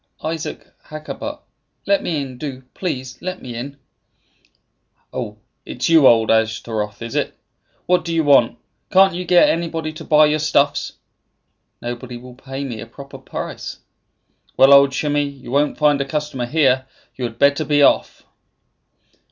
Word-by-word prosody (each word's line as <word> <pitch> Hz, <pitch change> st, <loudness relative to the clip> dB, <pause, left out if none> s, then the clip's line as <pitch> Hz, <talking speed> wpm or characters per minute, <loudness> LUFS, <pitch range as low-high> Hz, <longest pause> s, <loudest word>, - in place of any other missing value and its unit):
"Isaac 160 Hz, 0 st, -4 dB, 0.2 s
Hakkabut. 155 Hz, 0 st, -7 dB, 0.4 s
Let 300 Hz, -2 st, +2 dB
me 160 Hz, -4 st, -2 dB
in; 130 Hz, -3 st, -7 dB
do, 130 Hz, -2 st, -6 dB
please, 130 Hz, -8 st, -5 dB
let 185 Hz, 0 st, -4 dB
me 125 Hz, -, -8 dB
in." 135 Hz, +4 st, -6 dB, 1.4 s
"Oh, -, -, -5 dB, 0.3 s
it -, -, -8 dB
is -, -, +2 dB
you, 160 Hz, -5 st, +7 dB
old 115 Hz, -1 st, +5 dB
Ashtaroth, 110 Hz, -1 st, -1 dB
is 115 Hz, -, -6 dB
it? -, -, -1 dB, 0.5 s
What 180 Hz, 0 st, +2 dB
do 170 Hz, -, -4 dB
you 165 Hz, -1 st, +1 dB
want? 135 Hz, -5 st, +4 dB, 0.3 s
Can't 190 Hz, 0 st, +5 dB
you 180 Hz, +1 st, -4 dB
get 175 Hz, 0 st, +5 dB
anybody 165 Hz, -2 st, -2 dB
to 155 Hz, -, -9 dB
buy 155 Hz, 0 st, +5 dB
your 150 Hz, +1 st, +1 dB
stuffs?" 145 Hz, -1 st, +1 dB, 0.9 s
"Nobody 120 Hz, +1 st, -6 dB
will 125 Hz, +1 st, -12 dB
pay 135 Hz, +2 st, -7 dB
me 120 Hz, -6 st, -6 dB
a 115 Hz, -, -8 dB
proper 140 Hz, +3 st, -11 dB
price." 130 Hz, -, -6 dB, 0.8 s
"Well, 135 Hz, +1 st, +7 dB
old 140 Hz, 0 st, +7 dB
Shimei, 145 Hz, +1 st, 0 dB
you 140 Hz, -3 st, -6 dB
won't 145 Hz, +2 st, +1 dB
find 145 Hz, -2 st, +3 dB
a -, -, -1 dB
customer 145 Hz, -3 st, -3 dB
here. 130 Hz, -3 st, +2 dB, 0.3 s
You 130 Hz, -, -4 dB
had 115 Hz, -1 st, -6 dB
better 140 Hz, +2 st, +3 dB
be 145 Hz, -1 st, +3 dB
off." -, -, +2 dB
140 Hz, 160 wpm, -20 LUFS, 125-155 Hz, 1.4 s, you